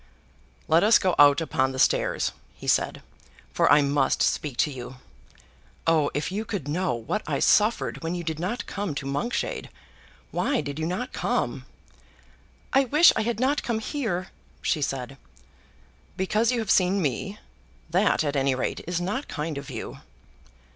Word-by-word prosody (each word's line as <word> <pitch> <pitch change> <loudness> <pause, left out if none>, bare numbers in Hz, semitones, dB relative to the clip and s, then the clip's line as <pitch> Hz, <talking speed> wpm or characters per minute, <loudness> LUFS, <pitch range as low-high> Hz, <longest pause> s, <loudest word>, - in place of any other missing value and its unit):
"Let 160 +3 +4
us 215 +2 +7
go 185 -2 +1
out 145 +1 +7
upon 130 -4 0
the - - -6
stairs," - - +2 0.2
he - - -12
said, - - +1 0.5
"for - - +3
I 145 - +6
must 140 -1 +1
speak 140 -5 -1
to 150 - -6
you. 125 -1 -8 0.9
Oh, 160 -3 +3
if 150 +4 -2
you 210 +3 -2
could 200 -10 -5
know 150 -4 0
what 115 - -3
I - - 0
suffered 215 +2 +2
when 165 +1 -3
you 175 - -4
did 160 -1 -3
not 200 +9 -3
come 200 -7 -4
to 140 - -4
Monkshade! 145 - -2 0.6
Why 280 -4 0
did 145 +1 -4
you 160 - -1
not 185 +8 -3
come?" - - -2 1.1
"I 270 0 +5
wish 300 +7 +6
I - - +1
had 230 0 -2
not 275 +3 +1
come 235 -2 -1
here," 220 - -3 0.3
she 155 - 0
said. 135 -1 -3 1.0
"Because 215 +5 +1
you 250 - 0
have 220 -4 -1
seen 185 +1 +3
me? 170 - -2 0.5
That, 185 -1 +3
at 145 -1 -2
any 135 -1 +2
rate, 130 - -2
is 175 -1 -1
not 205 +11 -3
kind 155 0 -4
of 140 -1 -7
you." - - -7
170 Hz, 170 wpm, -25 LUFS, 145-215 Hz, 1.1 s, us